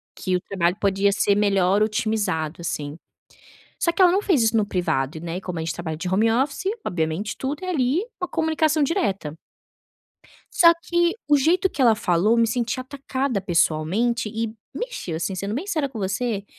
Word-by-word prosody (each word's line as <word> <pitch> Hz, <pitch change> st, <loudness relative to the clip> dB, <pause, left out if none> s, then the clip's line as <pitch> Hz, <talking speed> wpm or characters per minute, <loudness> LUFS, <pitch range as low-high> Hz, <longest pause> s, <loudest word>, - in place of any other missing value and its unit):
Que 185 Hz, -, -1 dB
o -, -, -7 dB
trabalho 180 Hz, -1 st, -1 dB
podia 200 Hz, 0 st, +2 dB
ser 200 Hz, 0 st, +2 dB
melhor 200 Hz, -1 st, +3 dB
otimizado, 210 Hz, -8 st, -1 dB
assim. 150 Hz, -2 st, -4 dB, 0.9 s
Só 335 Hz, -, +3 dB
que 335 Hz, -, -5 dB
ela 365 Hz, -2 st, +7 dB
não 385 Hz, +3 st, +1 dB
fez 345 Hz, -, +2 dB
isso 225 Hz, 0 st, +2 dB
no 215 Hz, -, +3 dB
privado, 160 Hz, -6 st, -1 dB
né, 170 Hz, +1 st, -5 dB
e -, -, -4 dB
como 180 Hz, -3 st, -5 dB
a -, -, -3 dB
gente 160 Hz, -1 st, -3 dB
trabalha 160 Hz, -2 st, -5 dB
de 180 Hz, -, -4 dB
home 215 Hz, +5 st, +2 dB
office, 270 Hz, +8 st, 0 dB, 0.2 s
obviamente, 165 Hz, +4 st, -2 dB
tudo 280 Hz, +4 st, -4 dB
é -, -, -5 dB
ali, 295 Hz, 0 st, +1 dB, 0.2 s
uma 360 Hz, -, -1 dB
comunicação 315 Hz, -1 st, +1 dB
direta. 200 Hz, -, -1 dB, 1.2 s
Só 335 Hz, -1 st, +8 dB
que 345 Hz, +3 st, +1 dB
o 295 Hz, -, +5 dB
jeito 345 Hz, +7 st, +2 dB
que 280 Hz, -, -4 dB
ela 235 Hz, -3 st, +5 dB
falou, 185 Hz, -1 st, +2 dB
eu 235 Hz, -, +4 dB
me 230 Hz, 0 st, +4 dB
senti 235 Hz, +2 st, -1 dB
atacada 260 Hz, -3 st, -3 dB
pessoalmente 190 Hz, +7 st, +1 dB
e 225 Hz, 0 st, -3 dB, 0.2 s
mexeu, 480 Hz, -, -4 dB
assim, 185 Hz, +3 st, -3 dB
sendo 200 Hz, +2 st, -3 dB
bem 300 Hz, -, -4 dB
sincera 310 Hz, -9 st, -1 dB
com 240 Hz, -5 st, -7 dB
você, 200 Hz, +1 st, -2 dB
215 Hz, 190 wpm, -23 LUFS, 180-280 Hz, 1.2 s, Só